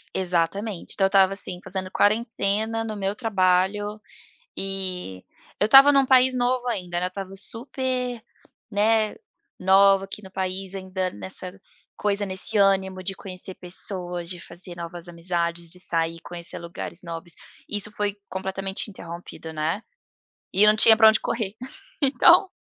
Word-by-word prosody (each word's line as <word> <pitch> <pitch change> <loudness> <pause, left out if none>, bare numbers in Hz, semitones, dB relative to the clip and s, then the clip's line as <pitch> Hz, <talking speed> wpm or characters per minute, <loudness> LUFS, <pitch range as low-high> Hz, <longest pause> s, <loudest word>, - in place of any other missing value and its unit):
Exatamente 185 +2 -1
então 195 - +2
eu - - +5
estava, 195 0 +4
assim, 185 -2 -3
fazendo 185 0 -3
quarentena 220 0 +1
no 215 -1 -5
meu 195 0 -2
trabalho, 205 -1 +1 0.6
e 185 - -3 0.4
eu 210 - +4
estava 270 +5 +9
em - - +3
um 270 -1 +4
país 255 0 +5
novo 250 0 0
ainda 180 -6 -2
não 180 - 0
estava 195 +1 -7
super, 250 +2 -3 0.5
né, 215 +1 +2 0.4
nova 195 +1 +5
aqui 205 +2 -9
no 190 - -12
país 190 0 -3
ainda 185 -1 -3
nessa 180 - -8 0.4
coisa, 205 0 0
nesse 190 +2 0
ânimo 190 -1 +2
de 195 - -2
conhecer 185 -1 -6
pessoas, 180 -1 -3
de 180 -1 -5
fazer 175 0 -8
novas 170 0 -7
amizades, 170 -1 -2
de 180 - -11
sair, 165 -1 -1
conhecer 175 -1 -6
lugares 170 +2 -7
novos, 165 0 -6 0.4
isso 210 0 -1
foi 205 -1 -2
completamente 190 +2 -3
interrompido, 170 -2 -9
né, 160 +6 -1 0.7
e 200 - +6
eu 210 - +7
não 215 - +5
tinha 220 +1 +7
para 220 -1 +8
onde 220 0 +3
correr, 215 -3 -2 0.5
então 340 +7 +5
195 Hz, 150 wpm, -24 LUFS, 180-210 Hz, 0.7 s, estava